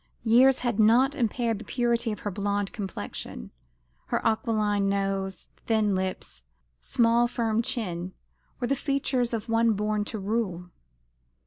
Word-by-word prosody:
Years 250 +3 +5
had 240 -3 -1
not 240 +6 +5
impaired 230 -3 -1
the - - -8
purity 235 +1 0
of 210 - -6
her 205 - -3
blonde 200 0 -2
complexion. 190 - -6 0.6
Her - - 0
aquiline 210 -3 +1
nose, 195 -1 -2 0.2
thin 215 -3 +2
lips, 185 - -3 0.4
small 235 - +3
firm 230 -2 0
chin, 185 -6 -3 0.4
were 245 - -1
the 275 - +1
features 265 -3 0
of 230 -1 -3
one 230 0 +3
born 210 0 0
to 220 - -5
rule. 195 -4 -2
220 Hz, 135 wpm, -27 LUFS, 200-235 Hz, 0.6 s, Years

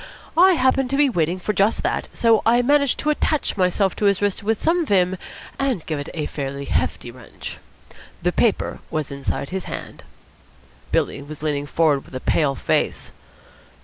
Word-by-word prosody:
I 370 +3 +7
happened 260 -3 +2
to 275 - 0
be 285 -2 +4
waiting 175 -2 0
for 210 +3 -2
just 200 +3 +2
that, - - -1
so 230 -2 +3
I 240 +2 +4
managed 280 +1 +3
to 300 - +2
attach 300 0 0
myself 190 0 +1
to 210 - 0
his 200 -2 +3
wrist 205 -2 0
with 220 +1 0
some 340 +2 +2
vim 185 - +2 0.4
and 265 - -1
give 155 -3 -3
it 145 - -6
a 155 -2 -2
fairly 140 -1 -4
hefty 85 - -1
wrench. - - -9 0.6
The 180 - +2
paper 220 +3 +1
was 155 -3 -3
inside 140 0 -3
his 190 -1 -3
hand." - - -7 0.9
Billy 140 - 0
was 150 +1 -9
leaning 145 -2 -1
forward 150 -3 +2
with - - -12
a - - -2
pale 140 0 +1
face. - - -1
190 Hz, 180 wpm, -22 LUFS, 150-245 Hz, 0.9 s, I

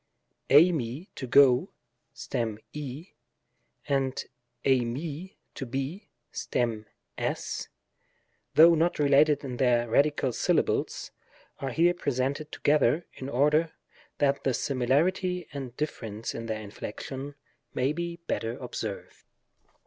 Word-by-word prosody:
jE///^, 150 -1 +4
"to 130 - -6
go" 125 -1 +5 0.4
(stem 110 -3 -3 0.2
^), 150 +3 -7 0.7
and 135 -2 0 0.4
dfii^ 140 +7 0 0.2
"to - - -6
be" 135 - -4 0.2
(stem 115 -3 -2 0.3
f^), - - -3 0.9
though 165 +2 +9
not 165 +2 +2
related 145 +1 +4
in 125 -3 -5
their 120 -2 +3
radical 140 +1 +2
syllables, - - 0 0.5
are 135 - -3
here 170 +6 +3
presented 140 -2 -2
together, 150 +2 +2
in 130 - -7
order 150 +5 +2 0.4
that 140 -1 +1
the 130 -3 +1
simaarity 165 +8 +1
and 130 -4 -6
diflference 115 -7 -4
in 115 0 -5
their 110 -1 -3
inflection 135 +7 -7 0.4
may 130 +3 +1
be 170 +1 -3
better 115 +1 -2
ob - - -8
served. - - -5
140 Hz, 110 wpm, -28 LUFS, 125-155 Hz, 0.9 s, though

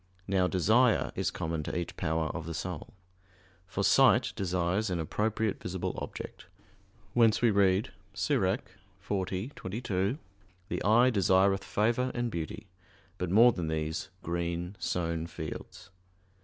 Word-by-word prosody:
Now 95 -2 +2
desire 110 +7 +3
is - - -1
common 80 -1 -3
to 75 - -4
each 85 - -4
power 80 0 -1
of 80 -2 -5
the 85 - -4
soul. 90 +1 -5 0.7
For - - -2
sight - - +5
desires 90 +2 0
an 90 -2 -1
appropriate 110 +6 -1
visible 90 0 -3
object; - - -7 0.7
whence 115 -1 +4
we 120 - +5
read 100 0 +3 0.2
(Ecclus. - - +1 0.5
40:22): 100 +2 -2 0.5
"The - - -2
eye 120 +5 +5
desireth 95 -2 +3
favor 120 +4 +1
and 120 -1 -1
beauty, 80 -5 -5 0.5
but 90 - -2
more 115 +6 +7
than 90 -7 -3
these 80 0 -2
green 85 +2 -3
sown 85 -2 -2
fields." 80 +4 -8
95 Hz, 130 wpm, -30 LUFS, 85-110 Hz, 0.7 s, more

